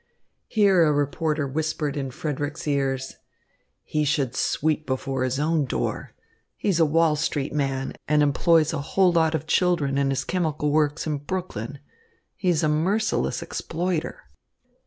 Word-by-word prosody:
Here 195 -5 +4
a 155 - +4
reporter 145 +1 0
whispered 155 0 -2
in 135 -2 -3
Frederick's 145 +2 -4
ears: 135 -2 -1 0.7
"He 150 - -1
should 140 -4 0
sweep 155 0 0
before 130 0 -2
his 130 +1 -1
own 155 0 +1
door. - - -3 0.4
He's 190 -5 0
a 165 - +5
Wall 160 0 +3
Street 145 -1 -2
man 135 -2 -1
and 150 0 +3
employs 155 +2 +3
a 155 - -2
whole 185 +5 +3
lot 160 -1 +2
of 160 - -3
children 160 -5 +1
in 140 -1 +2
his 135 0 -1
chemical 155 -5 -1
works 150 0 +1
in 150 -2 -2
Brooklyn. 145 - -5 0.6
He 185 - -1
is 170 -2 +2
a - - +3
merciless 185 +9 0
exploiter." 170 0 -3
150 Hz, 150 wpm, -24 LUFS, 140-165 Hz, 0.7 s, a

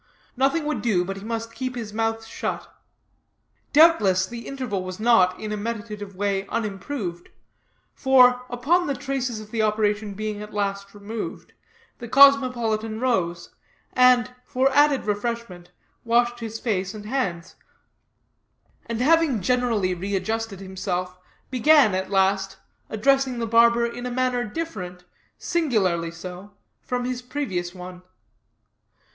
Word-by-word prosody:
Nothing 275 +5 +1
would 305 0 -2
do, 190 -7 +1
but 195 +1 -5
he 195 - -9
must 230 +1 -4
keep 255 0 -4
his 220 -4 -6
mouth 225 0 -1
shut. - - -4 1.0
Doubtless, 220 - +5
the 235 +4 -8
interval 250 -9 -3
was 185 +1 -7
not, 215 -6 +4
in 215 -1 -5
a 210 - -2
meditative 210 -2 -5
way, 195 0 -1
unimproved; 195 -4 -4 0.6
for, 250 -2 +5
upon 310 +9 +1
the 280 - -1
traces 255 -4 -3
of 215 0 -11
the 225 - 0
operation 210 -1 0
being 215 0 -4
at 210 0 -9
last 200 0 -3
removed, 210 +2 -7 0.5
the 240 - -7
cosmopolitan 240 -5 +4
rose, 180 -9 -1 0.4
and, 250 -1 +4
for 265 +2 +1
added 290 -1 +3
refreshment, 205 -4 -3 0.3
washed 240 +1 +2
his 225 -1 -6
face 195 -3 -2
and 210 -1 -9
hands; 195 -9 -3 1.3
and 230 0 -3
having 315 -3 +3
generally 225 -3 +1
readjusted 200 +3 -3
himself, 185 -1 -4 0.3
began, 260 -3 +5
at 190 0 -2
last, 195 0 +1 0.3
addressing 270 +3 +2
the 235 - -2
barber 235 +1 +4
in 245 +1 -5
a - - -3
manner 250 0 0
different, 200 - -6 0.3
singularly 205 - 0
so, 180 +4 -10 0.3
from 245 -1 -3
his 250 0 -3
previous 195 -10 -4
one. 180 0 -9
225 Hz, 130 wpm, -24 LUFS, 195-250 Hz, 1.3 s, Doubtless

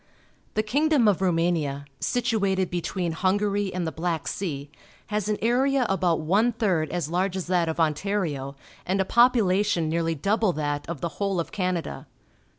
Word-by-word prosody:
— - - -37
The 215 - +2
king 285 +9 +1
dom 275 -8 +4
of 200 -4 +3
Rumania, 165 -6 0
situated 200 -6 0
between 175 0 -2
Hungary 200 +3 0
and 180 -1 -2
the 160 - -2
Black 165 -1 -2
Sea, 145 -7 -4 0.4
has 210 -1 0
an 210 - +1
area 260 +3 +2
about 180 -4 +1
one 205 +9 +2
third 185 -8 0
as 170 -3 -3
large 185 +2 0
as 185 - -3
that 175 -2 +1
of 160 - -3
Ontario 155 -4 -1 0.3
and 190 +2 -1
a 190 - +2
popula 225 -5 +4
tion 170 -6 0
nearly 165 0 0
double 200 +4 +1
thatof 145 0 -3
the 170 - -1
whole 195 -3 0
of 170 - -3
Canada. 180 - -3
185 Hz, 170 wpm, -25 LUFS, 165-210 Hz, 0.4 s, dom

